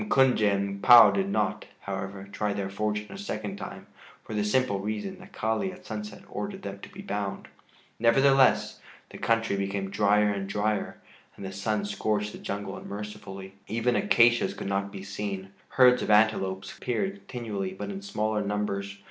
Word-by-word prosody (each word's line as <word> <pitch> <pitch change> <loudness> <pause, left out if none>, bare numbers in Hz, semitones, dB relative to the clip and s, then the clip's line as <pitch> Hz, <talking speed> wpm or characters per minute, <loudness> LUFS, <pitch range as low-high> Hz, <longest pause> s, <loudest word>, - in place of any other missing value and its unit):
M'Kunje 130 - +4
and 100 0 -2
M'Pua 115 -4 +9
did 100 0 0
not, 105 +1 0 0.2
however, 95 0 -5
try 105 0 -1
their 100 -1 -3
fortune 105 +1 -2
a 195 - -8
second 105 - -4
time - - -8 0.4
for - - -8
the 105 -1 0
simple 105 -1 +1
reason 110 - -4
that 185 +1 -14
Kali 110 - -1
at 185 0 -14
sunset 105 -1 -6
ordered 195 -1 -5
them 100 0 -6
to - - -10
be 195 - -10
bound. 100 - -4 0.5
Nevertheless, 135 +3 +4 0.3
the - - -10
country 115 -2 +1
became 100 0 -2
drier 105 0 +3
and 100 -1 -3
drier, 105 +1 -1 0.4
and 100 - -7
the 95 - -5
sun 100 +1 -1
scorched 105 0 -1
the - - -10
jungle 100 0 -4
unmercifully. 100 -2 -8
Even 115 +3 0
acacias 120 - +4
could - - -6
not 100 0 -1
be 95 -1 -8
seen. 100 -1 -5 0.2
Herds 125 -1 +5
of - - -3
antelopes 105 -3 +2
appeared 190 +11 -1
continually 105 -6 -4
but 200 - -5
in 195 0 -6
smaller 110 - -1
numbers. 100 -1 -2
105 Hz, 170 wpm, -27 LUFS, 100-115 Hz, 0.5 s, M'Pua